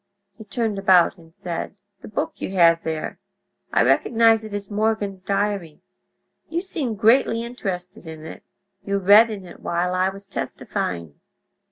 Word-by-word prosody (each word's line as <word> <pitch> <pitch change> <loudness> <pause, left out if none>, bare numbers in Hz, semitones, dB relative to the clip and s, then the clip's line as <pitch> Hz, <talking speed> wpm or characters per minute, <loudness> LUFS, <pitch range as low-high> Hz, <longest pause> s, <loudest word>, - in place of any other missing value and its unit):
He 220 - -12
turned 210 0 -2
about 185 -2 +4
and 165 0 -19
said: 175 +1 -5 0.2
"The - - -11
book 210 - -3
that - - -29
you 195 - -4
have 165 -2 +5
there—I 160 -1 -4
recognize 225 -1 +4
it 215 - -8
as 205 0 -5
Morgan's 205 -2 -1
diary. 195 -4 -2 0.7
You 335 +2 -1
seemed 280 - -3
greatly 230 +1 +3
interested 185 -8 -6
in 160 -1 -9
it; 160 - -9 0.4
you 200 0 -1
read 205 +4 +7
in 200 -4 -6
it 175 - -12
while 175 +1 -1
I 185 +1 +2
was 195 +1 -10
testifying. 85 - -4
195 Hz, 155 wpm, -23 LUFS, 175-220 Hz, 0.7 s, read